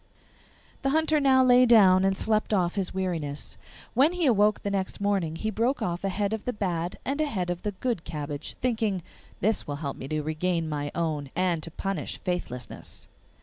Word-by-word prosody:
The 270 - +1
Hunter 315 +1 +3
now 265 -2 +5
lay 250 0 +6
down 190 -5 +7
and 195 0 +2
slept 215 0 +1
off 175 -3 +1
his 195 -3 -2
weariness. 165 -7 -3 0.4
When 280 +8 +4
he 360 -2 0
awoke 215 -4 +3
the 200 - -1
next 190 -1 -2
morning 195 -6 0
he 220 +6 -2
broke 235 +6 +1
off 175 +1 -2
a 195 - +1
head 200 +2 -1
of 220 - -4
the 250 - -1
bad 175 -4 -2
and 280 +3 -1
a 305 - +1
head 180 -9 -2
of 175 0 -4
the 210 - -3
good 220 -3 -2
cabbage, 145 -1 -5
thinking, 220 -7 0 0.4
'This 215 +2 +1
will 145 - -3
help 145 -1 -4
me 130 - -7
to 155 +1 -2
regain 165 +2 -1
my 145 -1 -2
own, 155 -4 -1
and 175 -2 +1
to 165 - -6
punish 190 -1 -4
faithlessness. 125 -9 -5
190 Hz, 195 wpm, -27 LUFS, 165-220 Hz, 0.4 s, down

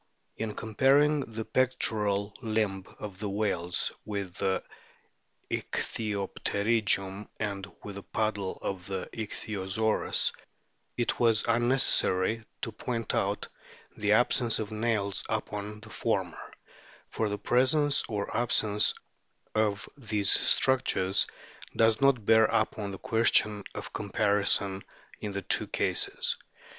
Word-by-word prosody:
In 110 -2 -4
comparing 135 +7 +3
the 115 -4 -5
pectoral 105 -5 0
limb 110 -5 -1
of 100 -3 -8
the 105 -1 -3
whales 95 -4 -1
with 100 -4 -4
the 95 -1 0 0.9
ichthyopterygium 100 -1 -1
and 100 -2 -4
with 105 - -7
the - - -6
paddle 105 -2 -2
of 95 -2 -4
the 95 -2 -4
Ichthyosaurus, 110 -1 -1 0.7
it 120 - -1
was 115 -3 +4
unnecessary 115 -3 +3 0.2
to - - -2
point 115 -3 -3
out - - -1 0.5
the 105 0 +2
absence 120 0 +3
of 110 -1 -4
nails 110 -3 -1
upon 105 +1 -4
the 105 -1 -11
former; - - -2 0.6
for 110 - -1
the 105 - -2
presence 140 +6 +3
or 105 -2 -3
absence 110 -3 +3 0.6
of 105 -1 0
these 105 -7 0
structures 110 -7 +3 0.5
does 115 +1 +3
not 135 -6 +3
bear 110 +1 +6
upon 110 -2 0
the 95 - -6
question 105 -1 +2
of - - -7
comparison 100 -1 +1 0.4
in 105 - -4
those 100 0 -3
two - - +3
cases. - - 0
105 Hz, 115 wpm, -29 LUFS, 100-115 Hz, 0.9 s, bear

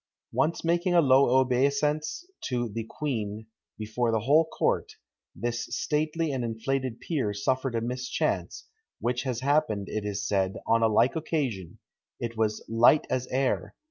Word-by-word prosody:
Once 165 - 0
making 175 +2 +2
a - - +7
low 130 -3 +5
obeisance 140 - +1 0.2
to 120 -2 -1
the 115 +2 -4
queen, 110 -6 -4 0.3
before 110 +2 -1
the 110 -1 +1
whole 150 +8 +4
court, 160 - -1 0.4
this 120 +4 -3
stately 155 +1 -1
and 130 -3 -2
inflated 120 +2 -2
peer 130 -11 -2
suffered 130 +4 -1
a 115 - 0
mischance, 125 +2 -2 0.3
which 125 +1 -1
has 125 -3 -3
happened, 135 -8 +1
it 110 - -3
is 105 0 -3
said, 95 -2 0
on 115 0 +3
a 115 - +5
like 115 +6 +3
occasion 135 - -2 0.4
it 115 -1 -4
was 110 -1 -1
"light 120 +6 +5
as 130 0 -1
air!" 130 0 -1
125 Hz, 150 wpm, -27 LUFS, 110-140 Hz, 0.4 s, a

